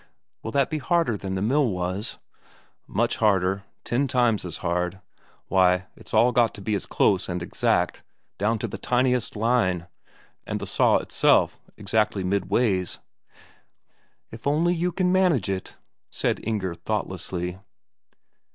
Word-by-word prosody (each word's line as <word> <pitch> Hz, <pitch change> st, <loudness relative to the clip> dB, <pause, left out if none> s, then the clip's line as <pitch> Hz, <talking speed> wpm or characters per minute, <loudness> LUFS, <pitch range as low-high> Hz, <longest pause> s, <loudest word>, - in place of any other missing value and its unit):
"Will -, -, -5 dB
that 140 Hz, +3 st, +1 dB
be 155 Hz, -, -1 dB
harder 165 Hz, -6 st, +1 dB
than 95 Hz, -1 st, -4 dB
the 95 Hz, -, -1 dB
mill 135 Hz, +4 st, +2 dB
was?" 95 Hz, +3 st, -3 dB, 0.7 s
"Much 115 Hz, +4 st, 0 dB
harder, 95 Hz, -2 st, +2 dB, 0.2 s
ten 135 Hz, +4 st, 0 dB
times 120 Hz, -4 st, +2 dB
as 85 Hz, -2 st, -4 dB
hard. 90 Hz, +2 st, -1 dB, 0.5 s
Why, 90 Hz, -1 st, +3 dB
it's -, -, -12 dB
all 125 Hz, +2 st, +4 dB
got 120 Hz, -1 st, +2 dB
to 100 Hz, -, -9 dB
be 105 Hz, +2 st, -2 dB
as 100 Hz, -, -2 dB
close 95 Hz, -2 st, +2 dB
and 90 Hz, -1 st, -3 dB
exact -, -, 0 dB, 0.4 s
down 110 Hz, +3 st, +1 dB
to 115 Hz, -, -3 dB
the -, -, -7 dB
tiniest 125 Hz, -1 st, +1 dB
line, 105 Hz, -6 st, +1 dB, 0.6 s
and -, -, -4 dB
the -, -, -5 dB
saw -, -, +3 dB
itself -, -, +2 dB, 0.2 s
exactly 105 Hz, -1 st, 0 dB
midways." 95 Hz, 0 st, +1 dB, 1.3 s
"If 115 Hz, +4 st, -7 dB
only 160 Hz, +5 st, +2 dB
you 175 Hz, +1 st, 0 dB
can 180 Hz, +1 st, +1 dB
manage 180 Hz, -, +2 dB
it," 95 Hz, -1 st, -4 dB, 0.3 s
said -, -, -1 dB
Inger 100 Hz, -5 st, -2 dB
thoughtlessly. 90 Hz, +1 st, -3 dB
105 Hz, 140 wpm, -25 LUFS, 95-125 Hz, 1.3 s, all